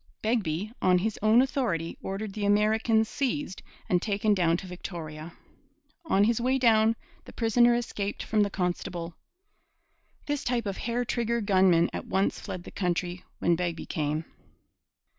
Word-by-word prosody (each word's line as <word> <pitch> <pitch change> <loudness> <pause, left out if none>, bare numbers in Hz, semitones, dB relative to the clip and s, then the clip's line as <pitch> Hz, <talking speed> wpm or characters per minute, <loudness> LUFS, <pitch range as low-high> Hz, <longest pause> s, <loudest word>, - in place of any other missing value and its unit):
Begbie 215 -3 -1
on 180 -1 +4
his 210 +4 -2
own 220 +4 +5
authority 210 - -1
ordered 195 +1 -4
the 210 - -4
American 220 +2 +3
seized 270 -3 -3 0.3
and 180 -1 +2
taken 210 +1 +1
down 170 -3 +2
to 190 - -8
Victoria. 165 -3 -7 0.7
On 200 -10 +3
his 230 +2 +2
way 260 +2 +2
down 225 -3 +4 0.3
the - - -11
prisoner 240 +1 +4
escaped 210 -4 -3
from 215 -1 +1
the 205 - +2
constable. 175 -2 -3 1.1
This 290 -1 -2
type 245 -2 -1
of 200 -1 -3
hair 240 +1 -2
trigger 235 0 0
gunmen 185 -5 +4
at - - -5
once 195 +1 0
fled 180 - -6
the - - -10
country 180 -1 -2
when 170 - +2
Begbie 170 -1 -3
came. 155 +1 -2
205 Hz, 150 wpm, -28 LUFS, 180-230 Hz, 1.1 s, own